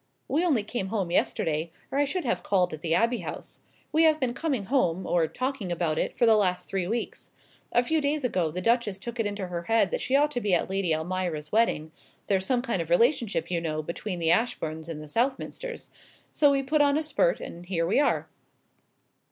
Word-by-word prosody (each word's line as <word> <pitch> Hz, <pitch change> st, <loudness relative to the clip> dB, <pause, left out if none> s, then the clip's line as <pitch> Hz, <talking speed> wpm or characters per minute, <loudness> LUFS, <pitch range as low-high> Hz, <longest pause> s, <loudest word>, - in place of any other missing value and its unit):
"We 310 Hz, +5 st, +1 dB
only 285 Hz, -12 st, +2 dB
came 210 Hz, -2 st, -3 dB
home 195 Hz, -4 st, -2 dB
yesterday, 160 Hz, -1 st, 0 dB, 0.2 s
or 275 Hz, -, 0 dB
I 290 Hz, -, +4 dB
should 350 Hz, +3 st, -2 dB
have 235 Hz, -, 0 dB
called 180 Hz, -4 st, +1 dB
at 155 Hz, -, -7 dB
the 165 Hz, -1 st, +1 dB
Abbey 235 Hz, +4 st, +2 dB
House. -, -, -7 dB, 0.3 s
We 315 Hz, -, +3 dB
have 315 Hz, -1 st, +5 dB
been 255 Hz, -4 st, 0 dB
coming 270 Hz, -5 st, -1 dB
home, 190 Hz, -8 st, +1 dB
or 170 Hz, -2 st, +2 dB
talking 255 Hz, -, -3 dB
about 165 Hz, -2 st, 0 dB
it, -, -, -2 dB
for 240 Hz, -, +4 dB
the 225 Hz, -1 st, +6 dB
last 185 Hz, -4 st, +1 dB
three 190 Hz, -2 st, -2 dB
weeks. 230 Hz, +4 st, -4 dB, 0.4 s
A 240 Hz, -, +3 dB
few 315 Hz, +5 st, +1 dB
days 290 Hz, 0 st, 0 dB
ago 185 Hz, -9 st, +1 dB
the 180 Hz, +4 st, -5 dB
Duchess 230 Hz, -4 st, +2 dB
took 235 Hz, +4 st, -7 dB
it 220 Hz, -, +1 dB
into 205 Hz, -1 st, -4 dB
her 175 Hz, -1 st, -3 dB
head 225 Hz, -3 st, +2 dB
that -, -, -1 dB
she 260 Hz, -, +1 dB
ought 295 Hz, +1 st, +4 dB
to 245 Hz, -, -2 dB
be 200 Hz, -4 st, +2 dB
at 175 Hz, -, -1 dB
Lady 190 Hz, -4 st, +1 dB
Almira's 160 Hz, -2 st, -3 dB
wedding 205 Hz, -8 st, +1 dB, 0.3 s
there's 190 Hz, -1 st, +1 dB
some 245 Hz, -2 st, +1 dB
kind 230 Hz, -9 st, -1 dB
of 165 Hz, -, -6 dB
relationship, 200 Hz, -, +2 dB
you 170 Hz, -2 st, 0 dB
know, 155 Hz, -2 st, -2 dB
between 180 Hz, +4 st, -4 dB
the 165 Hz, -1 st, +2 dB
Ashbournes 160 Hz, -6 st, -1 dB
and 155 Hz, -2 st, -6 dB
the -, -, -10 dB
Southminsters 270 Hz, -, -2 dB, 0.4 s
so 290 Hz, -, +4 dB
we 275 Hz, -1 st, +2 dB
put 295 Hz, +3 st, +2 dB
on 285 Hz, 0 st, +4 dB
a 315 Hz, -, 0 dB
spurt, -, -, +1 dB
and 175 Hz, +1 st, -9 dB
here 170 Hz, -3 st, 0 dB
we 180 Hz, -, +2 dB
are." 290 Hz, -, +1 dB
205 Hz, 220 wpm, -27 LUFS, 170-260 Hz, 0.4 s, the